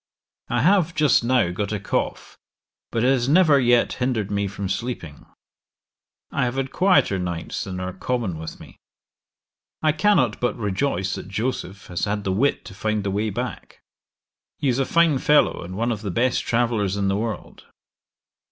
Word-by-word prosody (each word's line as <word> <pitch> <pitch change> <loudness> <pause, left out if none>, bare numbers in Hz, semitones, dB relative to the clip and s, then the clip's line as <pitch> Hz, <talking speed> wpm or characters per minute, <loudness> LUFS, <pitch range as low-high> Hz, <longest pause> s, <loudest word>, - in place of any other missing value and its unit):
'I 120 -1 +1
have 180 -1 +3
just 150 -5 +4
now 120 -7 +2
got 100 +3 -3
a 105 - -2
cough, - - -3 0.5
but 115 - -1
it 125 - +4
has 130 -1 +1
never 155 -3 +5
yet 120 -2 +3
hindered 115 -5 0
me 100 0 0
from 100 0 -5
sleeping: 95 - -5 1.0
I - - 0
have 120 +1 -2
had 135 0 -2
quieter 180 - +3
nights 85 -2 -4
than 95 -1 -5
are 90 0 -4
common 100 -4 -2
with 80 - -7
me. - - -14 1.1
'I 155 - +4
cannot 150 - +2
but 125 - -1
rejoice 95 -2 -1
that - - -6
Joseph 100 -2 -3
has 90 +2 -2
had 105 0 -2
the 95 - -1
wit 130 +10 +1
to - - -9
find 110 +1 -1
the 100 - -1
way 105 +3 0
back. 100 - -6 0.8
He 140 - 0
is 125 +1 +1
a 135 - +2
fine 165 -4 +3
fellow, 150 +3 +3
and 90 +2 -7
one 115 +2 0
of 105 -3 -3
the 105 - -4
best 120 +7 +1
travellers 115 -5 +1
in 100 -1 0
the 95 - +1
world. 110 +1 -5
115 Hz, 180 wpm, -23 LUFS, 95-130 Hz, 1.1 s, never